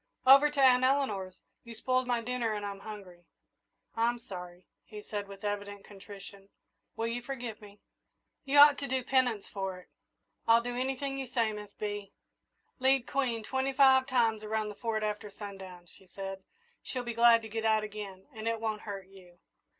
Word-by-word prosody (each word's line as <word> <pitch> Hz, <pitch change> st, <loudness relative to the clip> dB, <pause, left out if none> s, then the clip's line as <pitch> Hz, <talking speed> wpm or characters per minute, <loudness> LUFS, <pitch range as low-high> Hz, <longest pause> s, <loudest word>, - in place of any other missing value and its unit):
"Over 275 Hz, +3 st, +8 dB
to 295 Hz, -1 st, -5 dB
Aunt 255 Hz, -2 st, +6 dB
Eleanor's. 220 Hz, -9 st, 0 dB, 0.3 s
You 235 Hz, -1 st, -10 dB
spoiled 255 Hz, +2 st, 0 dB
my 240 Hz, -1 st, +1 dB
dinner 235 Hz, -1 st, -1 dB
and 205 Hz, -1 st, -4 dB
I'm 200 Hz, -1 st, -5 dB
hungry." 195 Hz, -5 st, -10 dB, 0.7 s
"I'm 235 Hz, +1 st, +1 dB
sorry," 180 Hz, -5 st, -10 dB, 0.2 s
he 210 Hz, -1 st, -10 dB
said, 205 Hz, -1 st, -5 dB
with 195 Hz, 0 st, -12 dB
evident 205 Hz, -1 st, -4 dB
contrition; 200 Hz, 0 st, -12 dB, 0.5 s
"will 225 Hz, -, -2 dB
you 235 Hz, +1 st, -2 dB
forgive 240 Hz, -4 st, -6 dB
me?" 205 Hz, -1 st, -15 dB, 0.6 s
"You 280 Hz, 0 st, +1 dB
ought 290 Hz, 0 st, +9 dB
to 280 Hz, -, -3 dB
do 260 Hz, -1 st, -1 dB
penance 250 Hz, -5 st, +1 dB
for 190 Hz, -2 st, -4 dB
it." 180 Hz, -, -16 dB, 0.6 s
"I'll 230 Hz, +1 st, +6 dB
do 245 Hz, 0 st, -4 dB
anything 270 Hz, +2 st, -2 dB
you 265 Hz, -, -4 dB
say, 230 Hz, -3 st, 0 dB
Miss 210 Hz, -1 st, -9 dB
Bee." 205 Hz, -1 st, -5 dB, 0.7 s
"Lead 265 Hz, -1 st, +3 dB
Queen 245 Hz, -5 st, -1 dB
twenty 265 Hz, +3 st, -1 dB
five 265 Hz, -1 st, +6 dB
times 230 Hz, -5 st, +1 dB
around 215 Hz, 0 st, -2 dB
the 210 Hz, -, -8 dB
Fort 220 Hz, -1 st, -2 dB
after 210 Hz, 0 st, -3 dB
sundown," 195 Hz, -3 st, -9 dB
she 185 Hz, +2 st, -18 dB
said. 195 Hz, +1 st, -7 dB, 0.4 s
"She'll 250 Hz, -2 st, -4 dB
be 240 Hz, -1 st, -4 dB
glad 230 Hz, 0 st, +6 dB
to -, -, -6 dB
get 220 Hz, +1 st, -4 dB
out 220 Hz, -1 st, +3 dB
again, 205 Hz, -3 st, -7 dB
and 220 Hz, 0 st, -6 dB
it 230 Hz, 0 st, 0 dB
won't 220 Hz, -1 st, -2 dB
hurt 200 Hz, -3 st, -6 dB
you." 185 Hz, -2 st, -17 dB
220 Hz, 180 wpm, -31 LUFS, 200-250 Hz, 0.7 s, ought